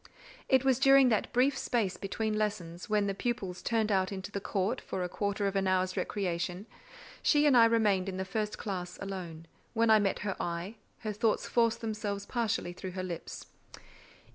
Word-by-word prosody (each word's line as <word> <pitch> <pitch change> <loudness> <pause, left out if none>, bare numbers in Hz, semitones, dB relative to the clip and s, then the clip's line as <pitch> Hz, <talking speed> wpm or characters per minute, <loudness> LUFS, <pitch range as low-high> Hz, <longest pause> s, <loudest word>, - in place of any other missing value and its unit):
It 265 -1 +4
was 265 -2 +3
during 270 -1 +6
that 220 - 0
brief 260 +3 +3
space 225 -8 0
between 215 +2 -2
lessons, 195 -5 -3
when 210 -1 +2
the 200 - -1
pupils 195 -4 -3
turned 220 -2 0
out 190 -1 +2
into 190 0 -6
the 200 - -4
court 200 +6 -1
for 185 - -4
a - - -1
quarter 200 +2 -2
of 200 0 -1
an 195 -1 +1
hour's 185 0 +1
recreation; 180 -1 -2 0.6
she 295 -1 +4
and 285 -3 +5
I 230 -1 +8
remained 210 -5 +2
in 185 - -5
the 190 - -2
first 210 +2 -2
classe 180 -4 -5
alone: 180 -5 -6 0.3
when 230 0 +4
I 215 - +7
met 200 -2 0
her 195 - -1
eye, 175 +6 -4 0.2
her 215 -3 -3
thoughts 220 +1 +1
forced 230 -1 +1
themselves 210 -3 -3
partially 225 -7 -1
through 185 0 -7
her 185 0 -4
lips. 175 -3 -6
205 Hz, 190 wpm, -31 LUFS, 185-225 Hz, 0.6 s, I